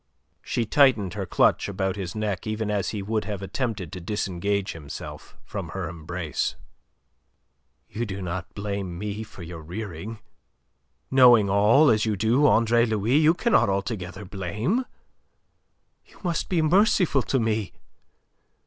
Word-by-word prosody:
She 120 - -1
tightened 110 - +3
her 100 -2 -4
clutch - - +2
about 95 -1 -1
his 95 -4 -5
neck 105 -2 -2
even 110 0 -2
as 100 -2 0
he 105 -3 -4
would 110 +1 -1
have 100 -2 -4
attempted 95 -3 -3
to 90 -2 -7
disengage 100 +1 -2
himself 75 -4 -9
from 95 -5 -6
her 95 +1 -4
embrace. 85 0 -3 1.3
"You 120 +1 -4
do 100 -1 -5
not 90 -1 -5
blame 100 -3 -4
me 105 +2 -4
for 100 -4 -10
your 85 -1 -8
rearing? 95 +4 -6 0.9
Knowing 120 -6 +6
all, 110 +10 +5
as 110 -1 +2
you 110 -2 0
do, 115 +9 +3
Andre 115 -1 +4
Louis, 110 +4 +1
you 155 +2 +5
cannot 230 - +3
altogether 100 -1 -3
blame. 105 - -2 1.2
You - - -20
must 175 -2 -1
be 170 -4 +2
merciful 180 - +3
to 135 +2 0
me. 110 -3 -1
105 Hz, 140 wpm, -25 LUFS, 95-115 Hz, 1.3 s, Knowing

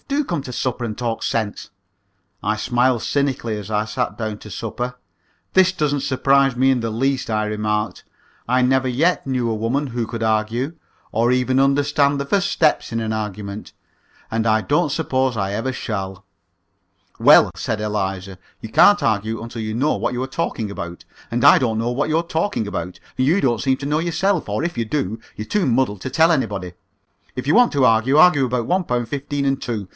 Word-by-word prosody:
Do 285 +1 0
come 170 - -2
to 130 - -7
supper 125 0 -2
and 110 -2 -4
talk 115 -2 -3
sense." 110 -3 -2 0.7
I 105 +1 +1
smiled 120 +1 +1
cynically 135 -6 -1
as 105 -1 -8
I 105 0 +1
sat 125 +3 -3
down 110 -2 -4
to 105 - -11
supper. 120 +5 -4 0.6
"This 185 0 +5
doesn't 145 -5 -1
surprise 135 0 +2
me 130 +2 +3
in 130 - +1
the 115 - -2
least," 130 +3 -1
I 110 -1 0
remarked. 105 0 -2 0.4
"I 125 +2 +2
never 130 +1 +2
yet 155 +9 +1
knew 125 -3 0
a 110 - -1
woman 120 +7 -1
who 120 -2 -3
could 115 0 -6
argue, 110 +6 0 0.4
or 115 +2 +2
even 125 +1 +2
understand 140 +1 +2
the 140 - -2
first 195 +6 +1
step 155 -2 +2
in 115 - -1
an 110 -1 -2
argument, 105 -1 -5 0.6
and 115 0 -1
I 110 0 +3
don't 145 +2 +1
suppose 130 -5 0
I 95 -1 -1
ever 115 +5 -2
shall." 95 -6 -5 0.9
"Well," - - +7
said 110 - -3
Eliza, 95 -3 -3 0.2
"you 110 - -8
can't 205 - +5
argue 110 0 0
until 115 0 -6
you 110 0 -3
know 140 +7 +1
what - - -2
you 125 - -2
are - - -4
talking 130 -7 -3
about, 85 -3 -7 0.2
and 120 +2 -1
I - - +9
don't 115 -4 0
know 115 +2 -1
what 140 +5 -1
you're 160 +2 +1
talking 165 - -1
about, 90 -2 -5 0.2
and 130 - +2
you 175 +7 +3
don't 120 -4 +1
seem 130 0 +1
to 140 - -7
know 150 +2 +1
yourself, 175 - 0
or, 105 +8 -1
if 170 0 -3
you 115 - +1
do, 110 -4 -2 0.2
you're 105 - -6
too 200 - 0
muddled 120 -6 +1
to - - -4
tell 160 +5 +4
anybody. 100 - -1 0.6
If 125 0 -5
you 145 - +3
want 245 0 +5
to 140 -2 +3
argue, 115 +4 +3
argue 155 -4 +6
about 125 -2 -2
one 185 +1 +1
pound 120 -6 -2
fifteen 140 +2 -3
and 135 0 +1
two. 110 -6 -4
125 Hz, 200 wpm, -21 LUFS, 110-140 Hz, 0.9 s, I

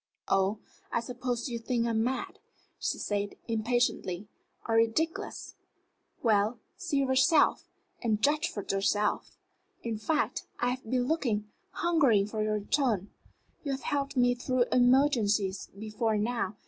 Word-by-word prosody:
"Oh, 195 +2 +2 0.3
I - - +1
suppose 245 +1 -3
you 235 -2 -3
think 235 0 0
I'm 225 -1 +1
mad," 260 +2 -3 0.4
she - - -1
said, 205 -1 -2
impatiently, 220 -4 0 0.4
"or 225 - 0
ridiculous. 230 +9 0 0.7
Well, 215 0 +3 0.2
see 280 -1 0
for 260 - -1
yourself, 305 +5 +4 0.5
judge 305 +7 +2
for 205 - -6
yourself. 200 +2 0 0.5
In 225 -2 -3
fact, 305 +8 -1
I 245 - +1
have 260 +1 -4
been 250 0 +1
looking, 225 -10 0 0.2
hungering, 280 -13 +3
for 215 +1 -3
your 215 0 +1
return. 210 -2 0 0.5
You 280 -2 -1
have 265 -2 -5
helped 280 -1 -2
me 245 0 +4
through 245 0 +1
emergencies 245 -7 +3
before 215 +1 -1
now. 215 -2 -1
235 Hz, 135 wpm, -30 LUFS, 210-260 Hz, 0.7 s, yourself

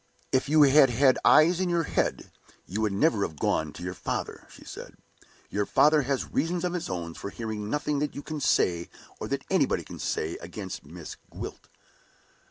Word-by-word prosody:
"If 130 +2 +1
you 155 0 +6
had 140 -1 +6
had 130 +2 +4
eyes 170 +3 +6
in 185 -1 0
your 170 -1 +1
head, - - -1 0.3
you 100 +5 -3
would 110 -2 +1
never 105 +2 +2
have 80 -5 -2
gone 80 +1 0
to 85 - -9
your 90 0 -3
father," - - -4
she - - -15
said. - - -9 0.6
"Your 105 0 -1
father 150 +1 +5
has 135 0 -2
reasons 170 +1 0
of 180 - -1
his 180 - -3
own 85 -2 -4
for 100 - -6
hearing 110 -1 -5
nothing 150 +1 -1
that 150 0 -2
you 145 - -6
can 155 -1 -5
say, 85 -8 +2 0.3
or - - -4
that - - -3
anybody - - +2
can - - -10
say, 80 +2 -2
against 95 +2 -7
Miss - - -9
Gwilt." - - -8
130 Hz, 190 wpm, -27 LUFS, 95-150 Hz, 0.6 s, you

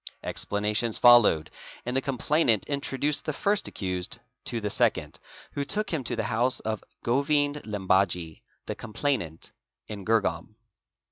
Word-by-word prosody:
Explanations 105 +2 -1
followed, 120 -10 +6 0.3
and 125 +1 -2
the 135 - +3
complainant 135 -3 +1
"introduced 140 +1 -1
the 155 - -1
first 200 +7 +1
accused 90 -2 -3 0.3
to 120 - -1
the 105 -2 -2
second, - - 0 0.3
who 145 - -2
took 210 +8 -1
him 150 -5 0
to 120 - -2
the 110 - -1
house 120 +2 +1
of 110 -1 -3
| - - -51
Govind 145 +3 +2
Limbaji, 95 -5 0 0.2
the - - -3
complainant, 110 - -3 0.4
in 105 -2 -7
Girgaum. 105 -3 0
115 Hz, 140 wpm, -27 LUFS, 100-140 Hz, 0.4 s, followed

